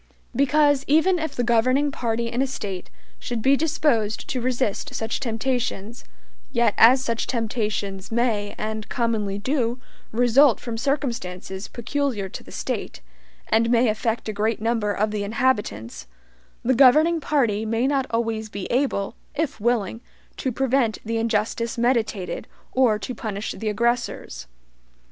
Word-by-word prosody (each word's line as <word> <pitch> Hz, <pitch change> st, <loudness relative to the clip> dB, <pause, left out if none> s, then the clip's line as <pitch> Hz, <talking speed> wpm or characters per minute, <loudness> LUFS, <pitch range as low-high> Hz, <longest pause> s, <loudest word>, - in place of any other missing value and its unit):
Because, 285 Hz, 0 st, +3 dB
even 330 Hz, +5 st, +4 dB
if 320 Hz, 0 st, -3 dB
the 245 Hz, -, 0 dB
governing 255 Hz, +5 st, +3 dB
party 235 Hz, -2 st, -1 dB
in 245 Hz, -, 0 dB
a 270 Hz, -, +2 dB
State 195 Hz, -8 st, -5 dB, 0.3 s
should 240 Hz, -2 st, -3 dB
be 270 Hz, +1 st, +5 dB
disposed 275 Hz, -8 st, 0 dB
to 255 Hz, -, -2 dB
resist 255 Hz, +1 st, -1 dB
such 225 Hz, -1 st, -2 dB
temptations, 235 Hz, -2 st, -2 dB, 0.5 s
yet 235 Hz, -5 st, +2 dB
as 255 Hz, +3 st, +6 dB
such 230 Hz, -2 st, -1 dB
temptations 210 Hz, -4 st, -2 dB
may, 225 Hz, -3 st, 0 dB
and 215 Hz, 0 st, -4 dB
commonly 220 Hz, -4 st, -1 dB
do, 245 Hz, +1 st, -1 dB, 0.3 s
result 245 Hz, +2 st, +5 dB
from 235 Hz, -2 st, -5 dB
circumstances 225 Hz, -8 st, -3 dB
peculiar 245 Hz, -4 st, -2 dB
to -, -, -8 dB
the -, -, -14 dB
State, -, -, -4 dB, 0.5 s
and 230 Hz, +1 st, +3 dB
may 240 Hz, 0 st, +4 dB
affect 225 Hz, +2 st, -1 dB
a 215 Hz, -, -2 dB
great 215 Hz, +2 st, 0 dB
number 225 Hz, -2 st, 0 dB
of 210 Hz, +1 st, 0 dB
the 210 Hz, -1 st, -2 dB
inhabitants, 205 Hz, -, -1 dB, 0.6 s
the 260 Hz, -, +3 dB
governing 305 Hz, +6 st, +5 dB
party 235 Hz, -9 st, +1 dB
may 225 Hz, +2 st, 0 dB
not 270 Hz, -1 st, +1 dB
always 225 Hz, -1 st, -1 dB
be 200 Hz, -2 st, -5 dB
able, 245 Hz, -6 st, 0 dB, 0.2 s
if 300 Hz, -8 st, -2 dB
willing, 225 Hz, -1 st, 0 dB, 0.3 s
to 260 Hz, -, -2 dB
prevent 260 Hz, -2 st, +1 dB
the 225 Hz, +1 st, -1 dB
injustice 225 Hz, +1 st, -1 dB
meditated, 230 Hz, -6 st, 0 dB, 0.2 s
or 250 Hz, -5 st, +3 dB
to 210 Hz, +5 st, -5 dB
punish 215 Hz, -3 st, -4 dB
the 220 Hz, -, -3 dB
aggressors. 235 Hz, -, -1 dB
230 Hz, 145 wpm, -24 LUFS, 215-260 Hz, 0.6 s, as